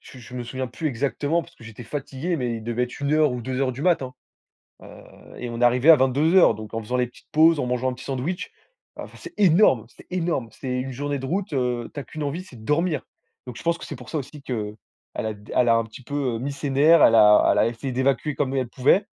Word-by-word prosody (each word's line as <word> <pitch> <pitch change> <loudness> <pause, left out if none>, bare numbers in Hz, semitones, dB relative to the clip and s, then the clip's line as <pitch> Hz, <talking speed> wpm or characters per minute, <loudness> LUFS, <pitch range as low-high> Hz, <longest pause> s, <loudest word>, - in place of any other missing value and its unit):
je 130 - -14
je 125 +1 -12
me 125 - -4
souviens 130 +2 -4
plus 140 +6 -5
exactement 145 +5 -1
parce 170 - -17
que 115 - -15
j'étais 115 +1 -10
fatigué 145 +6 -4
mais 120 -5 -2
il 110 - -8
devait 120 +2 -1
être 125 - -10
1:00 150 0 +2
ou 125 - -4
2:00 130 +2 -1
du 130 +3 -7
mat, 170 -3 +3
hein, 130 -1 -6 0.7
heu, - - -12 0.5
et 125 - -5
on 115 0 -5
est 120 - +4
arrivés 125 +6 +5
à 160 - +10
22:00 145 +4 +4
donc 110 0 -9
en 115 - -2
faisant 125 +4 -2
les 125 0 +1
petites 120 - -19
pauses, 160 +1 +5
en - - -1
mangeant 125 +1 0
un - - -4
petit 125 - -11
sandwich, 145 - -3 0.5
heu, - - -4
enfin - - -12
c'est 360 -1 -10
énorme, 170 - +5
c'est - - -17
énorme. 170 -9 -1
C'est 130 +1 -5
une 130 0 -5
journée 145 +2 -3
de 135 - -5
route, 185 +4 -2
heu, 125 -3 -1
tu 145 - -5
as - - -8
qu'une 155 - -7
envie, 150 +5 -3
c'est 135 -10 -14
de 110 - -13
dormir. 150 +2 0 0.4
Donc 125 -2 -8
je - - -10
pense 170 0 +1
que - - -9
c'est - - -7
pour 125 -1 -13
ça 160 - -2
aussi 140 +1 -8
qu'elle 110 -6 -4 0.4
a 110 -1 -3
d 105 +1 -13
elle 125 - +3
a 115 - +5
un 115 - +1
petit 115 +3 -12
peu, 145 - -8 0.2
heu, - - -4
mis 135 +4 -3
ses 140 0 -4
nerfs, 150 +4 +5
elle 115 - +6
a 105 -2 +7
elle - - +1
a - - +4
essayé 120 +3 -4
d'évacuer 135 +3 0
comme 135 -2 -1
elle 130 -2 -1
pouvait. 135 - +3
130 Hz, 270 wpm, -24 LUFS, 120-150 Hz, 0.7 s, à